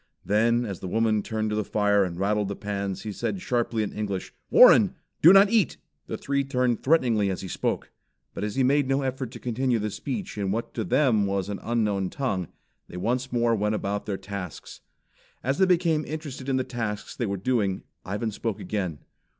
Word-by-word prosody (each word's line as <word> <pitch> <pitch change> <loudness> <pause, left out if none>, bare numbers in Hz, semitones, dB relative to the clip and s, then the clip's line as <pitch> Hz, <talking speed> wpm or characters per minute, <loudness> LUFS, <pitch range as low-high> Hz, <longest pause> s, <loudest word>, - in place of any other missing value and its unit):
Then 115 +5 +2
as 100 -5 -5
the 95 - -6
woman 110 +2 +2
turned 110 0 -2
to - - 0
the 105 - 0
fire 105 0 +2
and 90 -2 -4
rattled 105 +1 +1
the 100 - -4
pans, 100 -2 -4
he 110 - -4
said 185 - -3
sharply 120 -7 0
in 105 - -4
English: 100 -3 -4 0.2
"Warren, - - +7 0.3
do 165 - +9
not 195 +2 +7
eat!" 215 - +2 0.3
The - - -4
three 140 0 0
turned 125 -3 0
threateningly 120 -9 +3
as 95 - -3
he 95 - -6
spoke, - - -2 0.4
but - - -5
as 105 -1 -3
he 135 - +2
made 140 +1 +3
no 135 +1 +1
effort 130 -1 -3
to 120 0 -10
continue 125 +1 0
the 105 -1 -2
speech 110 -2 -5
in 100 -1 -1
what 115 +3 -2
was - - -37
to 115 - -2
them 110 - +3
an 100 +1 -2
unknown 105 -5 0
tongue, 95 - -2 0.4
they 90 - -9
once 125 +7 -1
more 120 -1 +2
went 105 0 +1
about 100 0 -3
their 100 -2 -2
tasks. 95 -5 -7 0.6
As 135 +3 0
they 190 - +5
became 170 -4 +2
interested 145 -3 -6
in 130 - +2
the 130 - +1
tasks 115 -5 -4
they 120 - -2
were 100 0 -2
doing, 100 -3 0 0.2
Ivan 105 +4 -3
spoke 110 0 -3
again. 95 -8 -3
110 Hz, 205 wpm, -26 LUFS, 100-130 Hz, 0.6 s, do